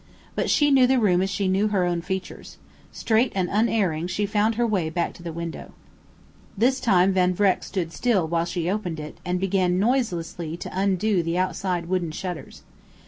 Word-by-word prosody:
But - - -1
she 290 -1 +3
knew 260 -2 +6
the 265 +1 +3
room 185 -5 +3
as 190 - 0
she 195 0 -1
knew 195 +3 +2
her 195 -4 +1
own 175 -1 -1
features. 190 +2 -6 0.3
Straight 230 +2 +1
and 185 -2 +1
unerring, 200 -7 +1
she 195 +3 -1
found 210 +2 +1
her 240 +2 +1
way 190 -8 0
back 170 +2 -2
to - - -14
the 170 -1 -5
window. 170 0 -7 0.8
This 255 +5 +2
time 190 -4 +3
Van 180 -1 +2
Vreck 195 -1 +2
stood 170 -4 -4
still 215 -9 +1
while 165 +1 0
she 175 -1 -3
opened 180 -4 -2
it 150 0 -8
and 180 0 -1
began 185 -1 +1
noiselessly 175 -8 -1
to - - -7
undo 195 0 +1
the 165 +1 -2
outside 185 -1 -1
wooden 175 -1 -1
shutters. 180 +1 -7
185 Hz, 190 wpm, -24 LUFS, 175-210 Hz, 0.8 s, knew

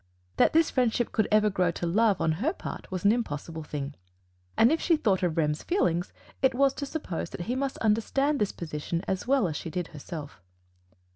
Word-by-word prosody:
That - - +4
this 325 0 +4
friendship 240 -2 +1
could 220 - +1
ever 210 0 +4
grow 180 -2 +2
to 175 - -4
love 205 +3 +3
on 160 - +2
her 315 +8 +1
part - - -7
was 185 0 -4
an 200 - +7
impossible 165 -8 -3
thing; 145 -2 -5 0.6
and 230 +4 +6
if 325 - +1
she 335 -3 +3
thought 200 -10 +1
of 175 -3 0
Rem's 150 -1 +1
feelings, 175 - 0 0.3
it 265 -2 +3
was 275 +1 +3
to 280 - -5
suppose 230 - -4
that - - -7
he 235 +8 -2
must 270 0 -2
understand 270 +7 +1
this 205 - +1
position 165 +1 -4
as 190 +4 -2
well 265 -7 +3
as 155 - -4
she 165 - -5
did 180 0 -3
herself. 150 - -8
200 Hz, 205 wpm, -28 LUFS, 165-260 Hz, 0.6 s, an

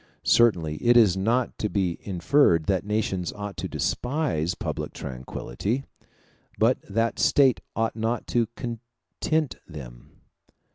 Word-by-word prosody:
Certainly 85 -10 +3
it 120 +6 +4
is 105 -6 +6
not 115 +6 0
to 105 - -1
be 95 -5 -1
inferred 95 - +3
that 95 +1 +1
nations 100 -5 -1
ought 105 -1 -6
to - - -3
despise 120 - -1
public - - -4
tranquillity; 70 - -4 0.7
but - - +3
that 115 +3 0
state 135 -3 +4
ought 115 0 0
not 115 +1 -1
to 120 -2 +1
content 120 +3 -3
them. - - -10
105 Hz, 125 wpm, -26 LUFS, 85-120 Hz, 0.7 s, is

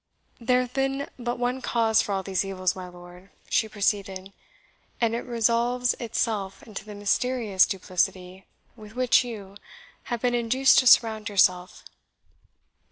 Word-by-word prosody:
"There 250 +1 +2
hath 250 -1 -6
been 270 +1 -1
but 240 0 -3
one 245 +2 -2
cause 225 -3 +2
for - - -5
all 195 -1 -1
these 190 -1 -1
evils, 185 -1 -2
my 185 -1 -7
lord," 180 +1 -14 0.2
she 220 - +1
proceeded, 195 -2 -2 0.7
"and 230 -1 +1
it 235 - -1
resolves 240 +1 +1
itself 220 -4 -3
into 215 -2 -8
the 210 0 -10
mysterious 210 0 +1
duplicity 185 -1 -3 0.3
with 215 -1 -13
which 255 0 +3
you, 205 -5 -9 0.5
have 240 0 -4
been 245 -1 +2
induced 240 +3 +4
to 255 - +1
surround 220 -3 +4
yourself. 185 -2 +1
220 Hz, 145 wpm, -25 LUFS, 195-245 Hz, 0.7 s, induced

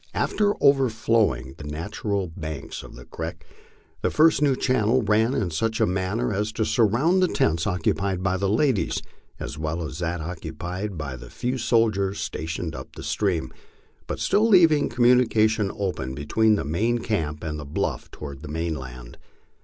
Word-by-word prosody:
After 205 -1 +1
overflowing 110 - +3
the - - -7
nat 80 +8 -6
ural 100 -5 -1
banks 80 -5 -6
of - - -12
the - - -11
creek, - - -6 0.6
the - - +1
first 155 -2 +4
new 140 -3 +4
channel 125 -1 +2
ran 110 +4 +2
in 95 -5 -1
such 110 +7 -1
a - - +4
manner 95 +6 -1
as 105 +2 -1
to 110 - 0
sur 115 - +3
round 155 - +2
the 185 - +4
tents 85 - +1
occupied 95 0 0
by 95 0 +1
the 100 +1 0
ladies 120 +1 +1 0.4
as 70 +3 -6
well 80 +2 -2
as 75 +1 -6
that 85 0 -2
occupied 90 +4 -5
by 70 -4 -4
the - - -11
few 125 +1 -3
soldiers 105 -5 +2
stationed 80 +1 -4
up - - -9
the - - -8
stream, 95 -6 -1 0.5
but - - -4
still 215 +2 +3
leaving 165 -7 +5
communication 115 -4 +3
open 90 -10 -3
be 75 +1 -6
tween 110 +6 +3
the 100 - -2
main 110 +11 +1
camp 80 -10 -2
and 75 -1 -3
the - - -6
bluff 70 - -3
toward 70 -2 -8
the 75 - -8
mainland. 65 -6 -5
100 Hz, 175 wpm, -25 LUFS, 80-115 Hz, 0.6 s, leaving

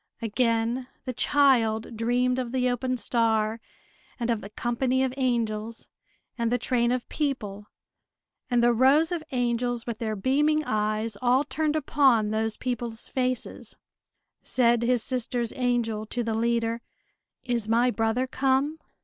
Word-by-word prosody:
Again 230 +2 0 0.2
the 255 - -3
child 235 -5 +2
dreamed 245 +3 +1
of 245 -2 -3
the 255 -1 +1
open 255 +1 -1
star, 225 -2 +1 0.6
and 235 0 0
of 225 -2 -1
the 200 - -8
company 250 +4 0
of 260 -1 -1
angels, 230 -4 -2 0.5
and 230 0 0
the 245 - +3
train 240 0 +1
of 250 -1 -2
people, 210 -9 -3 0.8
and 240 -1 +2
the 240 0 +5
rows 275 +8 +4
of 340 -3 -2
angels 245 -1 -1
with 235 -2 -5
their 220 -2 -2
beaming 295 +8 +2
eyes 215 -2 -1
all 255 +2 +3
turned 305 +1 -1
upon 265 -7 +3
those 220 0 -1
people's 240 -2 -4
faces. 255 -2 -3 0.7
Said 240 -2 +2
his 240 -1 +1
sister's 245 -2 -2
angel 240 -4 -1
to 240 +2 -2
the 225 -1 -2
leader: 230 0 0 0.6
"Is 235 -4 -1
my 240 +2 +3
brother 225 +2 0
come?" 270 +4 0
240 Hz, 140 wpm, -26 LUFS, 225-255 Hz, 0.8 s, the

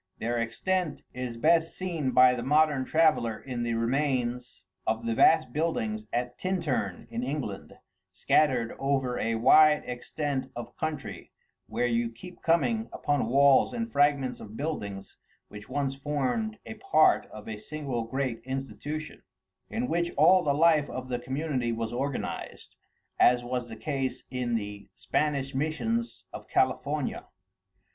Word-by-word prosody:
Their 120 +1 -1
extent 160 +9 -1
is 125 -2 -5
best 165 +5 +2
seen 170 -7 -2
by 125 0 +6
the 125 - -3
modern 145 0 +3
traveller 155 -9 +2
in 125 -3 -5
the 120 -1 -1
remains 125 -1 -1 0.2
of 115 +1 0
the 115 - 0
vast 155 +1 +4
buildings 110 -10 -1
at 120 +1 -2
Tintern 140 - -2
in 115 +1 -3
England, 125 -7 -4 0.4
scattered 130 -7 +2
over 135 -2 0
a 115 0 0
wide 150 +6 +6
extent 130 +2 -3
of 120 0 -7
country, 155 -3 -5 0.4
where 125 - -1
you 120 -1 +1
keep 120 +11 -12
coming 220 +7 +1
upon 145 -5 0
walls 140 +2 +5
and 230 -1 -3
fragments 140 - +2
of 110 +1 -10
buildings 100 -11 -5 0.3
which 105 0 -11
once 135 0 -1
formed 145 - -2
a - - -6
part 375 - +3
of 105 -1 -11
a 110 -1 -5
single 135 -1 -4
great 125 -1 -2
institution, 135 +4 -5 0.5
in 240 +3 -2
which 170 -2 0
all 180 +6 +6
the 145 -1 +1
life 155 -1 +4
of 130 0 -6
the 125 -1 -1
community 130 -2 -2
was 115 0 -3
organized, 135 +2 -4 0.4
as 125 0 +5
was 120 0 -3
the 110 - -7
case 135 +3 -3
in 125 -2 -1
the 105 -2 -5
Spanish 140 -2 -1
missions 165 - -2
of - - -8
California. - - 0
135 Hz, 145 wpm, -28 LUFS, 120-155 Hz, 0.5 s, by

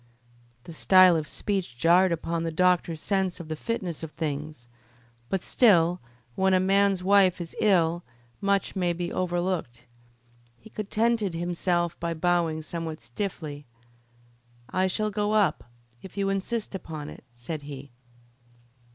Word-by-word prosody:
The 170 - -10
style 185 +2 +6
of 155 -1 -2
speech 190 - -3
jarred 175 +6 +4
upon 170 0 -2
the 165 0 -2
doctor's 175 -1 +2
sense 190 0 -1
of 165 -2 -9
the 155 - -2
fitness 180 -3 -4
of 160 - -5
things, 150 -4 -5 0.6
but 190 -2 -1
still 180 -7 +4 0.3
when 190 +6 +2
a - - +4
man's 195 0 +2
wife 190 -2 +4
is 170 -2 -7
ill 175 -4 +3 0.4
much 200 0 0
may 180 -2 +1
be 175 0 -4
overlooked. 175 -9 -2 0.7
He 220 - -16
contented 215 -2 0
himself 175 0 -1
by 170 0 -2
bowing 165 -2 0
somewhat 160 -1 -5
stiffly. 145 - -6 1.0
"I 185 +1 +2
shall 215 +3 -1
go 210 +1 -1
up, 210 -3 +2 0.4
if 190 +1 -12
you 195 -1 0
insist 205 +3 -2
upon 155 -6 -6
it," - - -11
said 120 +6 -6
he. 140 -1 -9
175 Hz, 140 wpm, -26 LUFS, 160-195 Hz, 1.0 s, style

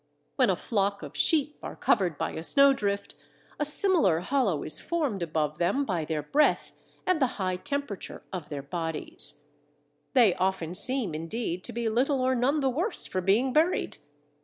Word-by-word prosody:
When 255 -5 +3
a 190 - +3
flock 200 0 -1
of - - -9
sheep 300 -2 +2
are - - -7
covered 175 -6 +1
by - - -2
a - - -6
snowdrift, 210 - +3 0.5
a - - +2
similar 295 - +4
hollow 205 - 0
is 155 - -2
formed 290 - -2
above 155 -2 -2
them 200 +12 +1
by 175 -8 -2
their 150 -1 -2
breath 295 - +2 0.3
and 365 -4 +1
the 265 - +4
high 185 -2 -1
temperature 280 -4 -5
of 175 -5 -5
their 145 -2 -5
bodies: 160 +1 -4 0.7
they 235 -8 +5
often 185 -3 -1
seem 240 - 0
indeed 170 +3 -3
to - - -6
be 235 0 -2
little 260 +5 +1
or 260 +1 +2
none 265 +5 +1
the 270 - +1
worse 350 - -2
for 185 - -2
being 220 +8 +2
buried. 325 +4 +1
210 Hz, 170 wpm, -27 LUFS, 175-275 Hz, 0.7 s, they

